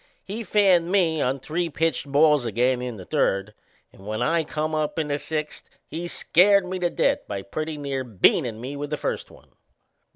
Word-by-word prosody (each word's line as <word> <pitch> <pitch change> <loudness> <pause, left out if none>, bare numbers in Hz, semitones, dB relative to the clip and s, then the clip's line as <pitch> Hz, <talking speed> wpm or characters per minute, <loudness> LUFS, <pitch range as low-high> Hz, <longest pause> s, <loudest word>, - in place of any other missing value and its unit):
He 215 +4 -5
fanned 185 -4 +3
me 165 -6 +2
on 130 +2 0
three 165 +5 -2
pitched 160 -2 -1
balls 150 -1 +4
again 125 +3 +1
in 125 -3 -5
the 95 - -10
third, 100 +3 0 0.4
and 95 - -16
when 110 0 -3
I 160 +7 +1
come 155 +1 -3
up 155 0 -1
in 155 -2 -1
the 145 0 -1
sixth 155 0 -4 0.2
he 170 +2 -5
scared 195 +3 +4
me 185 0 -4
to 175 -1 +1
death - - +1
by 100 -1 -4
pretty 155 +6 -4
near 140 -2 -3
beanin' 115 0 +2
me 130 +4 -6
with 145 +1 -5
the 150 - -2
first - - -3
one. - - -19
150 Hz, 195 wpm, -24 LUFS, 125-170 Hz, 0.4 s, balls